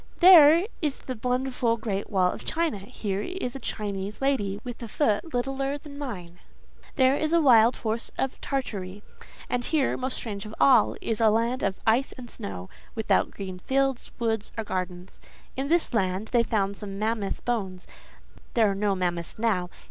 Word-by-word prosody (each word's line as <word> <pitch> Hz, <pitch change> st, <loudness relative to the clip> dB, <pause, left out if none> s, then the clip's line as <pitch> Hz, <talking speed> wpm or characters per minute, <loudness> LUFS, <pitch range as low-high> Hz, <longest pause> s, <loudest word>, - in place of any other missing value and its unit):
There 340 Hz, -1 st, +8 dB, 0.2 s
is 295 Hz, -4 st, 0 dB
the 255 Hz, -4 st, -7 dB
wonderful 250 Hz, -2 st, 0 dB
Great 205 Hz, -3 st, -3 dB
Wall 185 Hz, -3 st, +2 dB
of -, -, -8 dB
China; 320 Hz, -9 st, -1 dB
here 200 Hz, -1 st, -4 dB
is 315 Hz, -, -4 dB
a -, -, -5 dB
Chinese 205 Hz, -3 st, -4 dB
lady, 225 Hz, -8 st, 0 dB
with 245 Hz, -1 st, -7 dB
a 235 Hz, -, -5 dB
foot 225 Hz, +5 st, 0 dB
littler 270 Hz, +3 st, -1 dB
than 290 Hz, -1 st, -11 dB
mine. 180 Hz, -11 st, -7 dB, 0.6 s
There 260 Hz, 0 st, +4 dB
is 310 Hz, +2 st, -1 dB
a 340 Hz, -, +6 dB
wild 240 Hz, -5 st, +6 dB
horse 225 Hz, 0 st, -2 dB
of 265 Hz, -, -2 dB
Tartary; 205 Hz, -7 st, -4 dB, 0.4 s
and 245 Hz, 0 st, -1 dB
here, 295 Hz, 0 st, +1 dB
most 260 Hz, 0 st, -2 dB
strange 205 Hz, -4 st, -4 dB
of 215 Hz, -, -9 dB
all—is 140 Hz, -, +3 dB
a 220 Hz, -, +6 dB
land 230 Hz, +4 st, +1 dB
of 195 Hz, -1 st, -1 dB
ice 235 Hz, +5 st, +2 dB
and 245 Hz, -3 st, -10 dB
snow, 90 Hz, -2 st, -6 dB, 0.3 s
without 220 Hz, -1 st, +2 dB
green 185 Hz, -2 st, -7 dB
fields, 270 Hz, +3 st, 0 dB
woods, 225 Hz, -2 st, -1 dB
or 225 Hz, -, -1 dB
gardens. 185 Hz, -2 st, -5 dB, 0.4 s
In 270 Hz, +1 st, -2 dB
this 335 Hz, -4 st, +1 dB
land, 195 Hz, 0 st, 0 dB
they 240 Hz, -, +4 dB
found 200 Hz, -3 st, -1 dB
some 195 Hz, -2 st, -7 dB
mammoth 215 Hz, -1 st, -2 dB
bones: 195 Hz, -7 st, -2 dB, 0.7 s
there 220 Hz, -4 st, +4 dB
are -, -, -1 dB
no 200 Hz, 0 st, 0 dB
mammoths 175 Hz, -2 st, -2 dB
now. 205 Hz, -6 st, 0 dB
225 Hz, 170 wpm, -26 LUFS, 195-265 Hz, 0.7 s, There